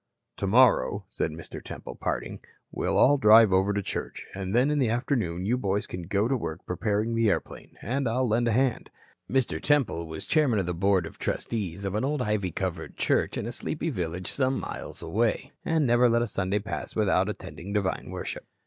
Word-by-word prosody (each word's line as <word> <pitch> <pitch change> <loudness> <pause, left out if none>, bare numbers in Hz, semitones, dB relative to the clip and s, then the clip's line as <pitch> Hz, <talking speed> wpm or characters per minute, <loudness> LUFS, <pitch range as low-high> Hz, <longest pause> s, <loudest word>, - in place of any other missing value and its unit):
"Tomorrow," 105 -1 +3
said 95 - -2
Mr. 80 +1 -9
Temple - - -8
in - - -19
parting, - - -3 0.3
"we'll - - -1
all 145 +1 +5
drive 110 -3 +7
over 95 +2 +3
to 100 0 -1
church, - - -5
and 95 +1 -3
then 130 +4 +4
in 150 - +1
the 125 -5 +2
afternoon 115 - -1
you 120 +5 +1
boys 100 -2 0
can 90 -2 -7
go 100 +3 +1
to 135 - +1
work 80 -10 -5
preparing 105 +4 -1
the 115 -1 +3
airplane, - - -4
and 130 0 -1
I'll 125 +2 +1
lend 115 +2 +2
a - - +2
hand." 125 +1 +1 0.4
Mr. 120 -12 0
Temple 130 - +1
was 80 0 -7
chairman 145 -8 +3
of 95 - 0
the 90 - -2
Board 95 0 +2
of - - -10
Trustees 100 -4 -3
of 95 - -2
an 105 - 0
old 140 -1 0
ivy 105 -4 0
covered 90 -2 -4
church - - +1
in - - -3
a - - -3
sleepy - - -3
village 90 +1 -3
some 130 -1 +1
miles - - -7
away, - - 0
and 160 -2 +1
never 120 0 +4
let 115 +1 +2
Sunday 100 -1 -1
pass 105 +1 -5
without 95 -2 +2
attending 100 -2 -7
divine 100 -2 -1
worship. - - -5
105 Hz, 200 wpm, -27 LUFS, 95-120 Hz, 0.4 s, drive